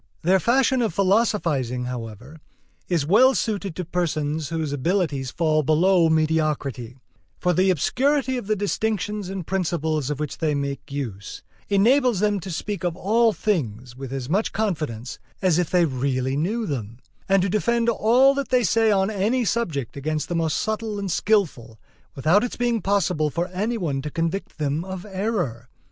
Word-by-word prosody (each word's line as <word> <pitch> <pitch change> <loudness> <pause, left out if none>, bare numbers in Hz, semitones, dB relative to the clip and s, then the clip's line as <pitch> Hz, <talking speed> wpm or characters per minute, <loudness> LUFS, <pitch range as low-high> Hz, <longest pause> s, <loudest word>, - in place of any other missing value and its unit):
Their 185 +3 +4
fashion 260 +3 +2
of 220 -8 -1
philosophizing, 170 - +1
however, 125 +4 -7 0.5
is 170 -5 +1
well 245 - +5
suited 200 -6 -2
to 180 - -4
persons 155 -3 -2
whose 160 -3 -2
abilities 145 -3 0
fall 155 +1 +1
below 165 +3 +3
mediocrity; 155 -6 0 0.4
for 180 0 +1
the 185 +3 +3
obscurity 260 - +1
of 245 -5 -5
the 215 - +2
distinctions 210 -1 -2
and 190 -3 -5
principles 160 -6 -1
of 150 -1 -3
which 150 -2 -4
they 155 -3 +1
make 140 +1 -4
use 115 -9 -6 0.3
enables 235 +3 +3
them 205 0 +1
to 190 - -8
speak 195 +4 -4
of 175 -2 -1
all 225 +5 +3
things 125 - -2
with 135 -1 -7
as 135 -2 -4
much 195 +9 0
confidence 150 - -3 0.2
as 180 -3 +2
if 175 - 0
they 180 -2 +3
really 130 -1 -1
knew 210 +10 -1
them, 115 - -4 0.3
and 195 -1 +4
to 195 - 0
defend 230 +4 +1
all 240 +4 +4
that 280 -1 -3
they 250 -1 +3
say 225 +3 +3
on 195 0 +2
any 220 +5 0
subject 165 - -2
against 155 +2 -3
the 175 - -1
most 165 -2 0
subtle 220 -1 -2
and 200 -2 -3
skillful, 155 - 0 0.4
without 160 - +3
its 245 - -3
being 240 -2 0
possible 180 -6 +1
for 170 +4 -2
any 210 +6 -2
one 145 -9 -2
to 150 - -5
convict 165 +5 -3
them 150 +1 -1
of 190 0 -7
error. 190 - -3
175 Hz, 170 wpm, -23 LUFS, 145-210 Hz, 0.5 s, well